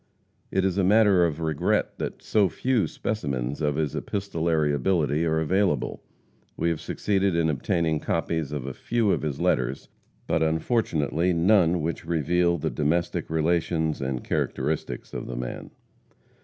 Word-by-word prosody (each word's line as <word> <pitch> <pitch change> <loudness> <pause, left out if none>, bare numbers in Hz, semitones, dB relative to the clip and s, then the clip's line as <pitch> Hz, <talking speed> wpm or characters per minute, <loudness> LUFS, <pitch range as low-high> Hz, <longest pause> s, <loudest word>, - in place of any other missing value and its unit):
It 95 0 +1
is 95 0 0
a - - +3
matter 100 -2 +5
of 80 -1 -5
regret 80 -3 0
that - - -5
so 105 -4 +3
few 120 -6 0
specimens 70 - -3
of 75 -2 +1
his 75 -2 -1
epistolary 85 -6 0
ability 75 +1 +1
are 80 0 +1
available. 90 -3 0 0.6
We 85 - +1
have 85 -3 -2
succeeded 100 -3 0
in 80 -1 +2
obtaining 80 +2 0
copies 80 -3 -2
of 70 -4 -4
a 70 - -4
few 115 - 0
of - - 0
his 75 -3 -3
letters, 65 +2 0 0.4
but 80 - 0
unfortunately 80 - +1
none 85 -1 +3
which 85 +1 -3
reveal 85 +2 +2
the - - -2
domestic 80 +4 -1
relations 80 -1 0
and 65 -2 -2
characteristics 75 +4 -2
of - - -5
the 60 - -5
man. - - -5
80 Hz, 150 wpm, -26 LUFS, 75-90 Hz, 0.6 s, matter